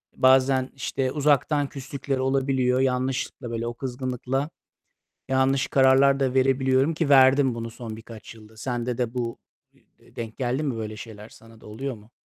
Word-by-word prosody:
Bazen, 130 0 +4
işte, 130 0 -2
uzaktan 145 0 +2
küslükler 135 0 -4
olabiliyor. 130 -1 +1
Yanlışlıkla, 130 -1 -1
böyle 115 0 -3
o 120 - -3
kızgınlıkla 130 +2 -3 0.8
yanlış 135 0 +2
kararlar 135 +1 +4
da 130 -2 0
verebiliyorum, 130 +2 +2
ki 160 -2 -1
verdim 135 -2 +5
bunu 115 0 -5
son 115 -2 -8
birkaç 115 0 -11
yılda. 110 0 -16
Sende 120 +1 -3
de 120 -2 -2
bu 120 -2 -3 0.6
e - - -24
e - - -23
denk 115 -1 -6
geldi 130 +3 -1
mi? 135 -6 -1
Böyle 110 -1 -5
şeyler 110 -1 -10
sana 115 0 -17
da - - -16
oluyor 130 +5 -5
mu? 110 +2 -18
130 Hz, 160 wpm, -25 LUFS, 115-135 Hz, 0.8 s, verdim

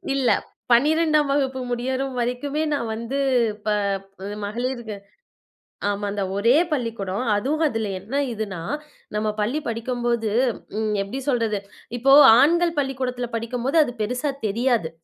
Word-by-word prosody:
இல்ல. 260 -3 +2 0.4
12ஆம் 305 +3 +4
வகுப்பு 265 -2 0
முடியற 255 +2 -1 0.2
வரைக்குமே 275 +6 -1
நான் 235 -6 -2
வந்து, 235 +5 -3 0.5
ப - - -6 0.8
மகளிர்க 240 0 -3 1.0
ஆமா. 205 0 -2
அந்த 200 -1 -2
ஒரே 230 +6 +4 0.2
பள்ளிக்கூடம். 225 -7 -2
அதுவும் 275 +10 0
அதுல 225 -5 -2
என்ன 220 +9 -7 0.2
இதுன்னா, 210 -5 -4 0.6
நம்ம 215 0 0
பள்ளி 250 +9 0
படிக்கும்போது 235 -1 -1 0.5
ம் 215 -1 0
எப்படி 200 +7 -4
சொல்றது? 230 -5 +1 0.4
இப்போ 270 +3 +4 0.3
ஆண்கள் 340 +4 +4
பள்ளிக்கூடத்துல 255 -3 -2
படிக்கும்போது 245 +6 -1
அது 245 - -4
பெருசா 250 +6 -1 0.2
தெரியாது. 230 -4 +1
245 Hz, 120 wpm, -23 LUFS, 220-270 Hz, 1.0 s, 12ஆம்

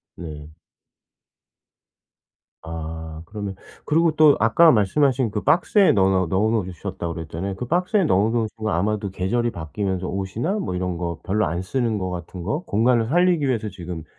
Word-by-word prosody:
네. 75 -2 -9 2.1
아 80 0 -6
그러면 100 0 -6 0.3
그리고 165 +1 +3
또 155 -2 +6
아까 160 +10 +5
말씀하신 125 +2 +2
그 105 - -2
박스에 195 +3 +4
넣어 95 -2 +3
놓 95 -1 +2
넣어 100 +5 +1
놓으셨다고 85 -1 -5
그랬잖아요. 85 +4 -5
그 125 - -5
박스에 180 - +1
넣어 105 -5 +2
놓으신 115 -2 -1
건 110 -1 -2
아마도 100 +2 -1
계절이 120 +6 -1
바뀌면서 95 +2 -3
옷이나 105 - -2
뭐 90 - -3
이런 90 -1 -2
거 85 -1 -4
별로 105 +3 +1
안 85 +2 -2
쓰는 115 +1 -1
거 95 -1 -3
같은 90 0 -7
거 150 - -1
공간을 115 +2 +2
살리기 175 +1 +3
위해서 110 -4 -1
지금 85 -4 -7
100 Hz, 345 characters per minute, -22 LUFS, 90-120 Hz, 2.1 s, 또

